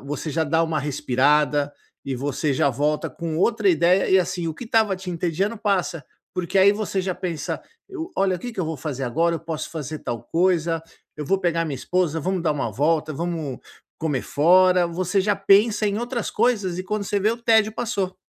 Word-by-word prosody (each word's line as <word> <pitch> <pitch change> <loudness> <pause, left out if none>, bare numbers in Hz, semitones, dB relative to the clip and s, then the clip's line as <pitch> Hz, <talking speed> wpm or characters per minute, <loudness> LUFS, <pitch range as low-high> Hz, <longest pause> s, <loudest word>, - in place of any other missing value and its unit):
você 145 +3 -5
já 160 +2 0
dá 160 +2 +2
uma 160 -1 0
respirada 145 +1 +1 0.3
e 135 -2 -3
você 145 +3 -1
já 135 - +2
volta 150 +4 0
com 165 -2 -4
outra 215 +2 +2
ideia 175 +2 +3
e, 190 - +6
assim, 175 -2 -1
o 160 - -4
que 245 - -8
estava 220 -4 +2
te 185 0 -9
entediando 180 +5 -1
passa, 190 -7 -1 0.3
porque, 180 +1 0
aí, 200 +2 +7
você 205 -2 -2
já 185 -1 -2
pensa: 170 -5 -4 0.3
"Eu 370 -2 -6
olha 190 -1 +2
o - - -10
que 245 - -5
que 220 - -15
eu 185 - +1
vou 160 0 -3
fazer 135 -1 -4
agora, 165 +7 +1
eu - - -9
posso 160 -1 -5
fazer 155 -1 -5
tal 115 -2 -4
coisa, 170 -2 +1 0.3
eu 150 - -5
vou 195 +7 +1
pegar 170 -3 0
minha 145 -3 -3
esposa, 170 +3 0
vamos 185 +2 -1
dar 160 - +1
uma 135 -7 -3
volta, 155 +5 +1
vamos 160 -4 -3 0.4
comer 150 -6 -1
fora", 180 +3 +4
você 180 +3 0
já 205 0 +1
pensa 205 +2 +4
em 200 0 0
outras 240 -1 -3
coisas 210 -6 +1
e - - -2
quando 210 +1 -2
você 200 0 -1
vê 215 - +3
o 230 - -2
tédio 220 -2 +4
passou. 195 -5 -2
175 Hz, 210 wpm, -23 LUFS, 155-195 Hz, 0.4 s, aí